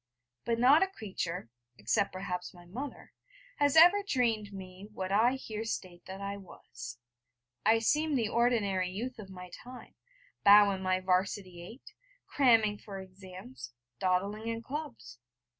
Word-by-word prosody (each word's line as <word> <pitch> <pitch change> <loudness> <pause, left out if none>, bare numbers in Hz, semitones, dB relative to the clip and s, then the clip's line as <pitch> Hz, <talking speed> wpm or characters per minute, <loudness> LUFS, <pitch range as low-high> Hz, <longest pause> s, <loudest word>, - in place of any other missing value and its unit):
But 235 -1 0
not 265 +6 +6
a 385 - +4
creature, 185 - -5 0.3
except 160 - 0
perhaps 180 -1 -5
my 175 0 -15
mother, 255 +11 -8 0.4
has 285 0 +2
ever 350 +5 +8
dreamed 230 - 0
me 190 0 -10
what 190 -2 -5
I 225 +5 +4
here 220 -5 -5
state 185 -5 -5
that 190 +1 -7
I 200 0 -4
was. 120 -10 -10 0.7
I 225 +1 +6
seemed 295 +6 +1
the 230 -3 0
ordinary 210 -6 +1
youth 235 +6 -5
of 200 -2 -9
my 180 -1 -10
time, 250 +1 -12 0.5
bow 205 0 +8
in 190 -1 -4
my 185 0 0
'Varsity 185 -1 -1
eight, 225 +9 -12 0.3
cramming 225 -6 +3
for 195 -2 -8
exams., 185 -11 -11 0.3
dawdling 200 +4 0
in 230 0 -3
clubs. 125 - -7
200 Hz, 145 wpm, -31 LUFS, 185-235 Hz, 0.7 s, ever